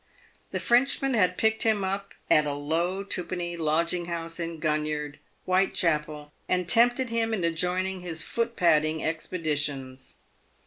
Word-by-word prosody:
The -, -, -3 dB
Frenchman 270 Hz, +2 st, +2 dB
had 185 Hz, -5 st, +2 dB
picked 220 Hz, 0 st, +1 dB
him 215 Hz, -3 st, +2 dB
up 195 Hz, +1 st, -3 dB
at 150 Hz, -1 st, +4 dB
a 145 Hz, -, -2 dB
low 170 Hz, +6 st, -1 dB
twopenny 175 Hz, -2 st, -3 dB
lodging 170 Hz, +2 st, 0 dB
house 165 Hz, 0 st, -4 dB
in 165 Hz, -1 st, -4 dB
Gun 155 Hz, -1 st, 0 dB
yard, 150 Hz, -1 st, -4 dB, 0.3 s
"Whitechapel, 155 Hz, -5 st, 0 dB, 0.2 s
and 180 Hz, -1 st, +1 dB
tempted 240 Hz, +5 st, +3 dB
him 225 Hz, -1 st, +1 dB
into 170 Hz, -4 st, 0 dB
joining 180 Hz, +3 st, -1 dB
his 165 Hz, -3 st, -3 dB
foot 235 Hz, 0 st, -2 dB
padding 155 Hz, -2 st, +2 dB
expeditions. 145 Hz, -5 st, -2 dB
170 Hz, 140 wpm, -27 LUFS, 155-195 Hz, 0.3 s, at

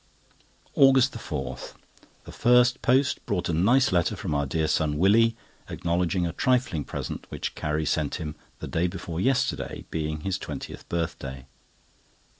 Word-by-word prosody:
AUGUST 135 Hz, -1 st, +5 dB
4.—The 65 Hz, -2 st, -8 dB
first 125 Hz, +1 st, +4 dB
post 130 Hz, +2 st, +2 dB
brought 90 Hz, -4 st, -1 dB
a -, -, 0 dB
nice 120 Hz, +11 st, +3 dB
letter 90 Hz, -2 st, +1 dB
from 95 Hz, -7 st, -4 dB
our 70 Hz, -1 st, 0 dB
dear 80 Hz, +3 st, 0 dB
son 75 Hz, -1 st, +1 dB
Willie, 110 Hz, +6 st, +4 dB, 0.3 s
acknowledging 85 Hz, +1 st, 0 dB
a 85 Hz, -, -3 dB
trifling 125 Hz, -, +1 dB
present -, -, -6 dB
which -, -, -4 dB
Carrie 75 Hz, +1 st, -2 dB
sent 75 Hz, -1 st, 0 dB
him, 75 Hz, -3 st, -5 dB, 0.2 s
the -, -, -7 dB
day 85 Hz, +2 st, 0 dB
before 85 Hz, -1 st, -5 dB
yesterday 130 Hz, +2 st, 0 dB
being 75 Hz, -1 st, -3 dB
his 95 Hz, +2 st, -2 dB
twentieth -, -, -7 dB
birthday. 70 Hz, -6 st, -4 dB
85 Hz, 140 wpm, -26 LUFS, 80-120 Hz, 0.3 s, AUGUST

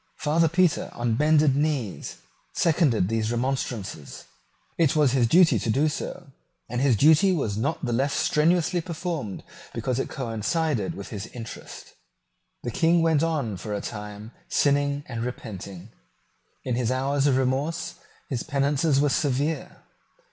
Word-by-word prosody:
Father 160 Hz, +2 st, +2 dB
Petre, 175 Hz, +1 st, +2 dB
on 120 Hz, -1 st, -1 dB
bended 150 Hz, +2 st, +4 dB
knees, 140 Hz, -8 st, -2 dB, 0.4 s
seconded 150 Hz, -, +2 dB
these 110 Hz, +1 st, -1 dB
remonstrances. 120 Hz, -, -3 dB, 0.6 s
It 160 Hz, -4 st, +3 dB
was 150 Hz, -4 st, +4 dB
his 125 Hz, -3 st, +3 dB
duty 170 Hz, +7 st, +5 dB
to -, -, -3 dB
do 140 Hz, +7 st, +3 dB
so; 140 Hz, -1 st, -6 dB, 0.4 s
and 120 Hz, +2 st, -2 dB
his 135 Hz, -4 st, +4 dB
duty 160 Hz, -, +5 dB
was 135 Hz, -, -1 dB
not 140 Hz, +7 st, -2 dB
the 120 Hz, -, -1 dB
less 135 Hz, +4 st, +1 dB
strenuously 170 Hz, +3 st, +2 dB
performed 165 Hz, -, -4 dB, 0.3 s
because 120 Hz, +2 st, -1 dB
it -, -, -2 dB
coincided 125 Hz, -, -1 dB
with 100 Hz, -, -8 dB
his 105 Hz, -1 st, -6 dB
interest. 115 Hz, -2 st, -10 dB, 0.7 s
The 120 Hz, -, -3 dB
King 165 Hz, +5 st, +3 dB
went 160 Hz, -3 st, +3 dB
on 145 Hz, -, -1 dB
for 105 Hz, +3 st, -4 dB
a -, -, -2 dB
time 105 Hz, 0 st, -7 dB, 0.2 s
sinning 145 Hz, 0 st, +1 dB
and 120 Hz, -2 st, -5 dB
repenting. 100 Hz, -5 st, -7 dB, 0.7 s
In 125 Hz, -, -2 dB
his 120 Hz, -1 st, 0 dB
hours 135 Hz, +2 st, +1 dB
of 130 Hz, -2 st, +3 dB
remorse 135 Hz, +6 st, -1 dB, 0.3 s
his 125 Hz, -4 st, -2 dB
penances 140 Hz, 0 st, +1 dB
were 145 Hz, 0 st, +3 dB
severe. 145 Hz, +3 st, -1 dB
135 Hz, 145 wpm, -25 LUFS, 115-155 Hz, 0.7 s, duty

